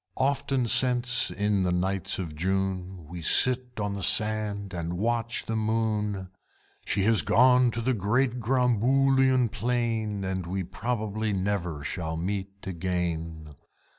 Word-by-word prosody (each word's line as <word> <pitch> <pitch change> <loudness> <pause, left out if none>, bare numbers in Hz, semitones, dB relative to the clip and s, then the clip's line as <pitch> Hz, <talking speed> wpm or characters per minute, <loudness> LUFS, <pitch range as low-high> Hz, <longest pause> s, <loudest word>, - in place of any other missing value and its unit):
Often 135 -1 0
since, 125 -1 +3
in 105 -1 0
the 90 -1 0
nights 95 +2 -1
of 85 -5 -6
June, 95 0 -3
We 85 +2 -8
sit 125 +7 +3
on 105 -1 -2
the 100 - -5
sand 105 -1 +3
and 85 0 -4
watch 115 +3 -1
the 115 - -3
moon, 105 -3 -1 0.5
She 100 - -1
has 110 +1 +3
gone 125 +1 +4
to 115 0 -3
the 130 +3 0
great 120 +4 0
Gromboolian 130 +1 +2
Plain, 115 -4 -2
And 95 -2 -3
we 95 +1 -3
probably 110 0 -3
never 95 -6 -2
shall 80 0 -4
meet 95 +3 -3 0.2
again! 85 -3 -4
105 Hz, 135 wpm, -26 LUFS, 95-120 Hz, 0.5 s, gone